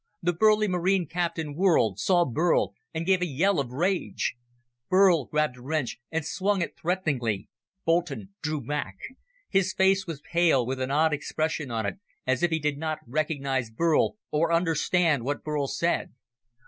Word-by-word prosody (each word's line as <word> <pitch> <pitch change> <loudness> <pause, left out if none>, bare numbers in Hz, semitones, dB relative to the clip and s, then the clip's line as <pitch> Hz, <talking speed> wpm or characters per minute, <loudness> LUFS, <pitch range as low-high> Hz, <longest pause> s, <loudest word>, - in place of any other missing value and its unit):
The 175 +1 +2
burly 215 +4 +4
Marine 185 0 +1
captain 165 -2 -2
whirled, 150 - +2
saw 175 -2 +3
Burl, 140 - +1 0.2
and 165 0 -3
gave 190 0 +3
a 180 - +1
yell 170 +5 +1
of 135 -3 -2
rage. 175 +8 -1 0.6
Burl 185 -6 +5
grabbed 150 -3 0
a - - -13
wrench 145 -2 -2
and 160 -2 -2
swung 195 +2 0
it - - -5
threateningly. 135 - -1 0.4
Boulton 170 +2 0
drew 155 -1 -2
back. 130 -7 -3 0.6
His 190 -1 +2
face 190 0 +3
was 165 -4 -5
pale, 165 -5 +2
with 130 +1 -3
an 130 - -1
odd 155 +3 +3
expression 155 0 -2
on 115 -2 -2
it, 100 - -4 0.3
as 130 -1 +1
if 175 - +3
he 160 - +1
did 150 -2 -1
not 155 0 -2
recognize 135 -2 -1
Burl 165 - +1
or 165 +2 +1
understand 165 -3 +2
what 145 +3 -3
Burl 150 -2 -1
said. 170 +6 0
160 Hz, 165 wpm, -27 LUFS, 140-175 Hz, 0.6 s, Burl